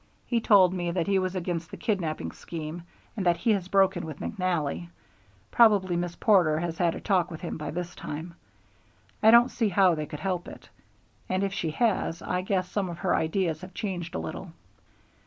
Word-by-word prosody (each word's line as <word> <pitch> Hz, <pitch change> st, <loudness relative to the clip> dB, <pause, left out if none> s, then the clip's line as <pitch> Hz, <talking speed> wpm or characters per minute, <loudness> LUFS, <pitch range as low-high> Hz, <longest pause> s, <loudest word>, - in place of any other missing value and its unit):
He 235 Hz, -2 st, 0 dB
told 190 Hz, -5 st, +5 dB
me 175 Hz, -2 st, -2 dB
that 170 Hz, -1 st, -1 dB
he 195 Hz, -1 st, +2 dB
was 185 Hz, 0 st, -2 dB
against 170 Hz, -2 st, -3 dB
that -, -, -9 dB
kidnapping 185 Hz, -9 st, -2 dB
scheme 165 Hz, 0 st, -7 dB, 0.3 s
and 205 Hz, -, -2 dB
that 175 Hz, -1 st, +3 dB
he 220 Hz, +7 st, +1 dB
has 195 Hz, -4 st, 0 dB
broken 190 Hz, -2 st, +2 dB
with 155 Hz, -3 st, -7 dB
McNally. 165 Hz, -, -2 dB, 0.6 s
Probably 205 Hz, -6 st, +4 dB
Miss 175 Hz, 0 st, -2 dB
Porter 180 Hz, -8 st, +4 dB
has 165 Hz, -1 st, -4 dB
had 170 Hz, -2 st, +2 dB
a -, -, -6 dB
talk 185 Hz, -4 st, +1 dB
with 165 Hz, -3 st, -8 dB
him -, -, -4 dB
by 150 Hz, -2 st, -5 dB
this 175 Hz, +2 st, -4 dB
time, 160 Hz, +4 st, -7 dB, 0.9 s
I 220 Hz, -, +6 dB
don't 235 Hz, +2 st, +7 dB
see 225 Hz, -4 st, 0 dB
how 190 Hz, -1 st, +4 dB
they 155 Hz, -2 st, -3 dB
could 150 Hz, -, -8 dB
help 185 Hz, -2 st, -2 dB
it, -, -, -12 dB, 0.6 s
and 185 Hz, +1 st, 0 dB
if 195 Hz, -1 st, -1 dB
she 180 Hz, -4 st, -2 dB
has, 190 Hz, -2 st, 0 dB
I 180 Hz, 0 st, -1 dB
guess 185 Hz, -1 st, -1 dB
some 195 Hz, -2 st, -2 dB
of 170 Hz, -, -6 dB
her 190 Hz, 0 st, +1 dB
ideas 160 Hz, -1 st, 0 dB
have 185 Hz, 0 st, -11 dB
changed 175 Hz, -5 st, -4 dB
a -, -, 0 dB
little." 80 Hz, 0 st, -6 dB
180 Hz, 200 wpm, -27 LUFS, 165-195 Hz, 0.9 s, don't